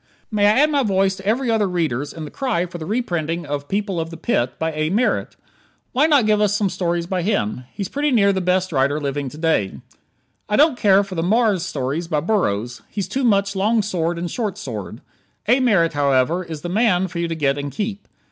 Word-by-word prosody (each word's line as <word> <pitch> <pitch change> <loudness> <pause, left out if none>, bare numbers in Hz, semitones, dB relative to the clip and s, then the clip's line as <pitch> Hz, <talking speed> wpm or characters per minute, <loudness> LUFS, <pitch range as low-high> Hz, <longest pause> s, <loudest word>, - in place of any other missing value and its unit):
May 205 -1 +3
I 215 +6 +4
add 305 +1 +3
my 285 -2 +2
voice 195 -4 +1
to 190 - -11
every 235 +3 +1
other 215 -3 +2
reader's 155 -7 -1
in 160 -2 -7
the 150 - -9
cry 245 -10 -1
for 175 -1 -8
the 160 - -6
reprinting 175 -7 -2
of 145 0 -4
"People 200 -1 -1
of 165 0 -3
the 165 - -9
Pit," 125 - -1
by 160 0 -1
A. 155 0 -1
Merritt? 220 +8 0 0.6
Why 275 +5 +3
not 285 -7 +4
give 210 -1 +3
us 210 -1 +2
some 200 -3 0
stories 170 -1 -1
by 185 +1 -2
him? 130 - -1
He's 200 - -4
pretty 290 +6 -1
near 200 -6 +4
the 190 - -1
best 185 +1 +1
writer 140 +1 +1
living 140 -1 -3
to 150 - -12
day. 155 - +1 0.8
I 210 - +2
don't 300 +1 +5
care 200 -4 +4
for 195 -1 -8
the 165 - -1
Mars 205 0 +2
stories 150 0 -3
by 155 -3 0
Burroughs. 120 - -1
He's 200 -4 -3
too 260 +8 -2
much 200 -4 +2
long 215 +3 +2
sword 175 -4 -1
and 175 0 -4
short 215 -6 -3
sword. 110 -7 -6 0.5
A 245 +4 +4
Merritt, 195 -10 +3
however, 145 +4 +2
is 160 -4 -7
the 175 - -5
man 190 -2 +2
for 170 -1 -6
you 170 - 0
to 165 - -3
get 145 -2 0
and 140 0 -4
keep. 205 - -4
180 Hz, 225 wpm, -21 LUFS, 155-210 Hz, 0.8 s, don't